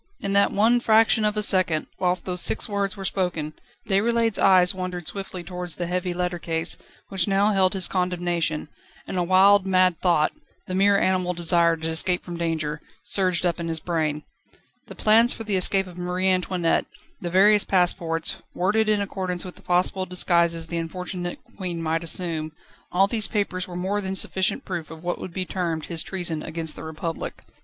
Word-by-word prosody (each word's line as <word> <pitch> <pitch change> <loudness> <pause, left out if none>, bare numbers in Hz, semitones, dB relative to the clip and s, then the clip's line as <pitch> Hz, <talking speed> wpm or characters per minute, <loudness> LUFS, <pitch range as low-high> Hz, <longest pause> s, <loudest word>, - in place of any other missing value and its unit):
In 195 - -3
that 200 0 +4
one 225 +4 +4
fraction 225 -1 +4
of 210 0 +1
a 210 - +1
second, 185 -6 +1
whilst 180 0 0
those 180 -1 0
six - - +2
words 200 -2 -2
were 195 - -6
spoken, 170 -6 -2 0.3
Déroulède's 225 +2 +1
eyes 185 -2 +5
wandered 180 -2 -5
swiftly 190 -1 -5
towards 180 -1 -6
the 175 - -3
heavy 180 +1 -2
letter 175 0 -2
case, 165 0 0 0.3
which 190 -2 0
now 200 +2 +3
held 190 -1 +3
his 190 -2 +1
condemnation, 175 -4 -1 0.4
and - - -6
a 180 - +1
wild, 190 +2 +5
mad 185 -3 +3
thought 170 -4 +3 0.3
the 185 - -6
mere 200 +2 +4
animal 185 -2 +1
desire 170 0 +2
to 160 0 -4
escape 175 +2 0
from 175 - -6
danger 160 -3 -2 0.2
surged 185 -2 +1
up 175 0 0
in 170 - -3
his 165 -1 -2
brain. 155 -3 -2 0.6
The - - -10
plans 225 +3 +4
for 225 - -7
the 210 -3 -1
escape 190 +1 +3
of 180 -1 -11
Marie 180 +1 0
Antoinette, 180 -2 0 0.3
the 175 - -3
various 200 +3 +5
passports, 170 -3 0 0.2
worded 215 +4 +1
in 210 -1 +2
accordance 185 -2 -3
with 180 - -7
the - - -15
possible 185 +1 0
disguises 170 -2 +2
the 170 +1 -3
unfortunate 175 +1 -5 0.2
Queen 180 -4 -4
might 165 0 -1
assume 160 -2 -2 0.4
all 190 +2 +4
these 215 +1 +2
papers 190 -3 -2
were 180 - -8
more 190 +3 -1
than 190 -1 -4
sufficient 190 0 -1
proof 175 -4 -5
of 160 +1 -11
what 175 0 -2
would 185 - -6
be 185 +1 -3
termed 170 -4 -3
his 165 -2 -1
treason 175 -5 -3
against 160 0 -3
the - - -9
Republic. 160 +1 -5
180 Hz, 185 wpm, -24 LUFS, 170-195 Hz, 0.6 s, eyes